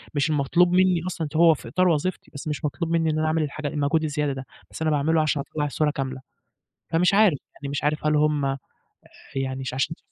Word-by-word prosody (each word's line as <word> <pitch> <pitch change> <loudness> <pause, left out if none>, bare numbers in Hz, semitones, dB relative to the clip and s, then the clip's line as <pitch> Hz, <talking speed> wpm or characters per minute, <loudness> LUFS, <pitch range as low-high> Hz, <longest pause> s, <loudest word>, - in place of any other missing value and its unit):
مش 145 +2 +1
المطلوب 155 +4 +3
مني 185 -2 +4
أصلًا، 165 -3 -3
هو 165 0 +6
في 150 - -9
إطار 185 0 +2
وظيفتي 170 +3 -1
بس 140 +1 -7
مش 150 +1 -3
مطلوب 165 +3 -2
مني 165 -1 +2
إن 155 - 0
أنا 155 - +1
أعمل 160 0 +1
الحاجة 150 +1 -4
المجهود 150 +2 0
الزيادة 150 -2 -1
ده، 135 0 -7 0.3
بس - - -9
أنا 160 -1 +1
باعمله 155 +2 +2
عشان 150 -2 0
أطلّع 150 -1 -2
الصورة 150 +1 0
كاملة. 130 -2 -4 0.7
فمش 175 +3 +3
عارف، 200 -8 +5 0.2
يعني 140 - -7
مش 145 - -3
عارف 150 +1 0
هل 150 0 +3
هم 150 -2 +1 0.8
يعني 135 0 -2
مش 130 -1 -4
عشان 145 +5 -1
150 Hz, 215 wpm, -24 LUFS, 140-165 Hz, 0.8 s, هو